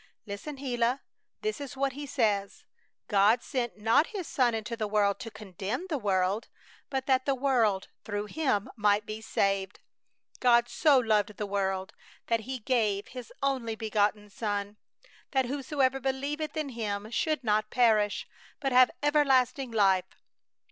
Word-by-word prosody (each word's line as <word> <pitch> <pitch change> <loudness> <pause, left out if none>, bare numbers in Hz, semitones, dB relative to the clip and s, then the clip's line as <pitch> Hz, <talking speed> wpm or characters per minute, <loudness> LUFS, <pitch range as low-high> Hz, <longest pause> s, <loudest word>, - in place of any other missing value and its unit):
"Listen, 205 +8 -6
Gila! 250 -1 0 0.4
This 430 -8 -2
is 275 -1 -7
what 275 0 +1
He 290 +1 -6
says: 210 -7 0 0.4
'God 210 +4 +4
sent 240 -4 -3
not 225 +9 +3
His 395 -5 -5
Son 245 -4 +2
into 220 +1 -4
the 220 -2 -2
world 205 -1 +2
to 225 - -6
condemn 210 - -5
the 295 - 0
world, 195 0 0 0.4
but 265 -1 -2
that 260 -1 +2
the 275 - +3
world 240 -8 +1 0.2
through 205 0 -3
Him 210 -4 0
might 205 -1 +2
be 215 +1 -6
saved.... 195 -2 0 0.6
God 240 -1 +4
so 290 +2 +4
loved 210 -4 +1
the 210 - -2
world 190 -1 -2 0.3
that 230 -1 +1
He 260 +4 -5
gave 215 -4 0
His 250 -3 -9
only 255 -5 0
Begotten 210 -1 0
Son, 205 -3 -3 0.6
that 265 -1 +3
whosoever 270 0 0
believeth 280 +4 -2
in 305 -2 -2
Him 215 -3 -4
should 305 +2 0
not 215 -1 +1
perish, 220 -4 +2 0.3
but 275 -2 -1
have 255 0 +7
everlasting 270 -3 +3
life.' 190 -4 +1
230 Hz, 150 wpm, -29 LUFS, 205-265 Hz, 0.6 s, have